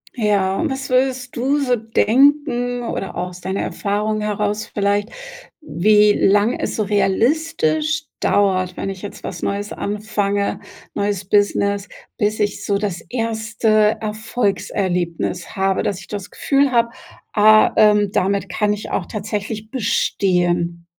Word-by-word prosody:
Ja, 200 Hz, -4 st, +1 dB
und 320 Hz, -, 0 dB
was 265 Hz, -1 st, -4 dB
würdest 255 Hz, -1 st, 0 dB
du 270 Hz, +5 st, +1 dB
so 260 Hz, -3 st, +1 dB
denken 245 Hz, +2 st, +2 dB
oder 195 Hz, -, -4 dB
auch 180 Hz, 0 st, -3 dB
aus 180 Hz, 0 st, -12 dB
deiner 190 Hz, +1 st, -2 dB
Erfahrung 210 Hz, +1 st, -2 dB
heraus 210 Hz, 0 st, -2 dB
vielleicht, 205 Hz, +1 st, 0 dB, 0.5 s
wie 210 Hz, -, +4 dB
lang 205 Hz, +4 st, +3 dB
es -, -, -3 dB
so 215 Hz, -, 0 dB
realistisch 310 Hz, +10 st, +1 dB, 0.2 s
dauert, 185 Hz, -3 st, +1 dB
wenn 195 Hz, -, -3 dB
ich 190 Hz, -, -9 dB
jetzt 205 Hz, -, -8 dB
was -, -, -6 dB
Neues 200 Hz, +1 st, -3 dB
anfange, 205 Hz, -1 st, -2 dB, 0.3 s
neues 200 Hz, -1 st, -2 dB
Business, 200 Hz, 0 st, +1 dB, 0.3 s
bis 210 Hz, +1 st, 0 dB
ich 205 Hz, -1 st, -1 dB
so 200 Hz, -, 0 dB
das 200 Hz, -4 st, -3 dB
1. 220 Hz, -2 st, +1 dB
Erfolgserlebnis 195 Hz, -6 st, -2 dB
habe, 190 Hz, 0 st, +1 dB
dass 195 Hz, -2 st, -2 dB
ich -, -, -13 dB
das 205 Hz, -3 st, -6 dB
Gefühl 275 Hz, -1 st, +1 dB
habe, 235 Hz, -1 st, +3 dB, 0.4 s
ah, 215 Hz, 0 st, +6 dB
ähm, 210 Hz, -2 st, +4 dB
damit 195 Hz, 0 st, 0 dB
kann 210 Hz, +3 st, 0 dB
ich 210 Hz, 0 st, -4 dB
auch -, -, -2 dB
tatsächlich 215 Hz, +1 st, -5 dB
bestehen? 175 Hz, -7 st, 0 dB
210 Hz, 135 wpm, -20 LUFS, 200-230 Hz, 0.5 s, ah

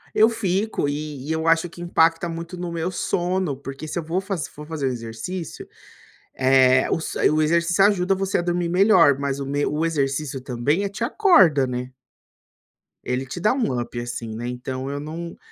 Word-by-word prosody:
Eu 220 Hz, +2 st, +6 dB
fico, 205 Hz, -6 st, -1 dB
e 145 Hz, -2 st, -5 dB
e 160 Hz, -, -2 dB
eu 160 Hz, 0 st, -1 dB
acho 165 Hz, +1 st, +3 dB
que 175 Hz, +1 st, -12 dB
impacta 165 Hz, 0 st, +2 dB
muito 170 Hz, +2 st, -6 dB
no 175 Hz, -1 st, -5 dB
meu 170 Hz, +2 st, -2 dB
sono, 180 Hz, -5 st, -1 dB
porque 135 Hz, +3 st, -8 dB
se -, -, -5 dB
eu 170 Hz, -, -2 dB
vou 170 Hz, +4 st, -1 dB
faze 195 Hz, -5 st, -3 dB
se -, -, -8 dB
for 150 Hz, +1 st, -11 dB
fazer 160 Hz, -4 st, -3 dB
o -, -, +2 dB
exercício, 120 Hz, +9 st, -6 dB, 0.7 s
eh, 130 Hz, -1 st, +4 dB
o -, -, +2 dB
s 160 Hz, -, -5 dB
o 155 Hz, -, +2 dB
exercício 170 Hz, +4 st, +3 dB
ajuda 195 Hz, -2 st, +3 dB
você 195 Hz, +1 st, 0 dB
a 175 Hz, -, 0 dB
dormir 175 Hz, 0 st, -1 dB
melhor, 180 Hz, -6 st, +5 dB
mas 140 Hz, -1 st, -2 dB
o 140 Hz, -, -4 dB
meu 145 Hz, +2 st, -1 dB
o 155 Hz, +2 st, 0 dB
exercício 140 Hz, -3 st, -1 dB
também 130 Hz, +7 st, -1 dB
é 200 Hz, -, -1 dB
te 210 Hz, +4 st, -4 dB
acorda, 190 Hz, -, +5 dB
né? 125 Hz, 0 st, -4 dB, 1.1 s
Ele 125 Hz, +1 st, -2 dB
te 135 Hz, +7 st, -7 dB
dá 210 Hz, +6 st, +3 dB
um 140 Hz, -, 0 dB
up 120 Hz, 0 st, -6 dB
assim, 120 Hz, -2 st, -5 dB
né. 120 Hz, +2 st, -5 dB
Então, 130 Hz, +2 st, -5 dB
eu 145 Hz, 0 st, -3 dB
não 165 Hz, +3 st, -7 dB
160 Hz, 200 wpm, -23 LUFS, 135-180 Hz, 1.1 s, Eu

